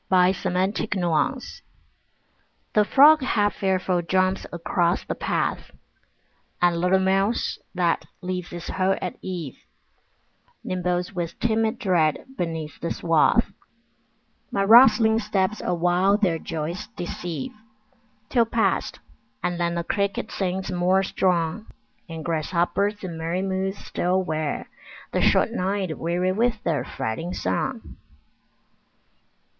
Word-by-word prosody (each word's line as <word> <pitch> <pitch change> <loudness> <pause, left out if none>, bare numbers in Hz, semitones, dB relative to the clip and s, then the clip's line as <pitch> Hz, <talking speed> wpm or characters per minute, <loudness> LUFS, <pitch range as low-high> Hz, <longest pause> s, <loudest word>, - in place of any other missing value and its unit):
Summer 185 0 +2
Evening 195 - 0 1.3
The 210 - +5
frog 295 +7 +6
half 205 -5 +1
fearful 185 -2 +1
jumps 185 +2 0
across 175 +1 0
the - - -2
path, - - -2 0.9
And 175 -1 +2
little 180 +2 +4
mouse 195 +4 +1 0.2
that 175 -2 +1
leaves 180 -1 -4
its 175 -1 -7
hole 190 0 +1
at 180 - -5
eve 175 -8 -6 1.0
Nimbles 180 0 -2
with 170 -1 -4
timid 225 -1 +1
dread 175 - +1
beneath 165 -5 -4
the 170 - -3
swath; 165 +7 +2 1.0
My 195 - 0
rustling 225 0 +7
steps 210 -1 -1
awhile 180 +3 +2
their 180 -6 +1
joys 165 +7 -4
deceive, 170 -4 -5 0.8
Till 235 -3 +3
past, 230 0 0 0.4
and 175 -1 -1
then 170 0 0
the 170 - -1
cricket 200 +2 -2
sings 190 0 -2
more 185 +2 +2
strong, 180 +2 0 0.4
And 160 -1 -7
grasshoppers 175 +5 0
in 170 -3 -5
merry 170 +3 -2
moods 190 +1 -2
still 185 +2 -1
wear 155 -3 -3 0.4
The - - 0
short - - +3
night 190 -5 -1
weary 175 +2 0
with 225 +2 0
their 160 -4 0
fretting 165 +11 -4
song. 240 -4 -3
185 Hz, 115 wpm, -24 LUFS, 170-200 Hz, 1.3 s, rustling